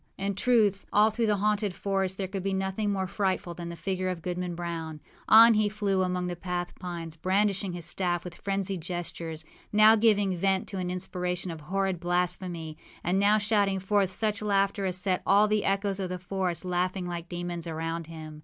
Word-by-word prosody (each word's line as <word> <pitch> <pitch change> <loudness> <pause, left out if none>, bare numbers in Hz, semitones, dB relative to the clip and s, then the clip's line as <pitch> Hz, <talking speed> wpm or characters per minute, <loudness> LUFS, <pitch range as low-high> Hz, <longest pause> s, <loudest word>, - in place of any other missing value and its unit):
â 195 - -4
In 200 - 0
truth, 205 -2 +2
all 210 +2 +5
through 230 +1 0
the 210 -1 +2
haunted 205 -1 0
forest 195 -1 -1
there 195 - -2
could 195 0 -4
be 195 +1 -1
nothing 190 +2 -1
more 190 -1 -1
frightful 190 -2 -1
than 170 0 -7
the 170 - -6
figure 185 +1 -2
of 175 -3 -4
Goodman 180 -1 -3
Brown. 165 -2 -5 0.3
On 230 +1 +9
he 215 -1 +2
flew 200 -2 0
among 180 -1 0
the 180 0 -3
black 175 0 -4
pines, 170 -3 -6
brandishing 195 +2 0
his 175 -2 -6
staff 175 -2 -1
with 180 - -7
frenzied 195 0 -2
gestures, 165 -2 -5 0.3
now 215 +1 +7
giving 205 -4 +3
vent 190 +2 +1
to 195 - -4
an 180 -1 -2
inspiration 180 0 -3
of 160 -2 -8
horrid 190 +2 -1
blasphemy, 175 -2 -1 0.2
and 180 +3 +1
now 205 +2 +5
shouting 205 -2 +2
forth 195 0 +1
such 210 +2 -1
laughter 200 -1 +1
as 185 -1 -1
set 185 0 0
all 205 +2 +5
the 210 -1 +1
echoes 195 0 0
of 185 -2 -2
the 180 - -3
forest 185 -1 -2
laughing 180 +1 -1
like 175 -1 -5
demons 175 -1 -4
around 165 0 -3
him. 155 -2 -9
185 Hz, 200 wpm, -28 LUFS, 175-200 Hz, 0.3 s, On